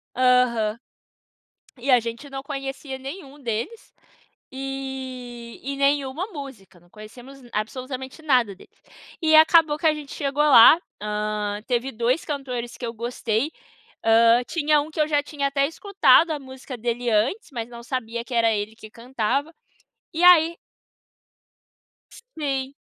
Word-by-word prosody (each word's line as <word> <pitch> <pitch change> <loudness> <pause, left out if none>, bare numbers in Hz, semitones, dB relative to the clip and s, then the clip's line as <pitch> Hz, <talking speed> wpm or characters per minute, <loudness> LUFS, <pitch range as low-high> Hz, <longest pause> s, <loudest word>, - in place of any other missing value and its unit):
Aham. 245 -4 +3 1.0
E 255 +3 -6
a 250 - +7
gente 235 +5 -7
não 270 0 -6
conhecia 275 -1 -6
nenhum 275 +1 -9
deles 240 - -5 0.6
e 260 -3 -7
e 275 +1 -4
nenhuma 280 +5 0
música, 270 - -10
não 175 +1 -25
conhecemos 245 +7 -13
absolutamente 255 +6 -5
nada 250 -9 +2
dele. - - -18 0.5
E 315 -1 +4
acabou 315 -1 +6
que 325 - -6
a 310 - +4
gente 295 -2 -8
chegou 285 +1 -1
lá, 295 +2 +8 0.2
hã, 210 0 -3
teve 250 +1 -1
2 240 +6 0
cantores 255 -5 -4
que 245 - -5
eu 230 - -4
gostei, 235 +3 -2 0.5
hã, 230 +2 +5
tinha 305 -2 +2
um 300 - -7
que 310 - -8
eu 300 - +2
já 295 -2 +2
tinha 285 -1 -2
até 275 0 +1
escutado 365 -1 +3
a 300 - -2
música 260 -1 -9
dele 240 +1 -2
antes, 235 - 0
mas 235 -3 -5
não 235 -1 -10
sabia 235 -2 -4
que 245 - -10
era 230 -1 +3
ele 210 +1 -3
que 220 -1 -12
cantava. 255 +6 -2 0.6
E 330 - -1
aí 340 -2 +7 1.8
Sim. 275 -3 -2
260 Hz, 145 wpm, -23 LUFS, 235-290 Hz, 1.8 s, lá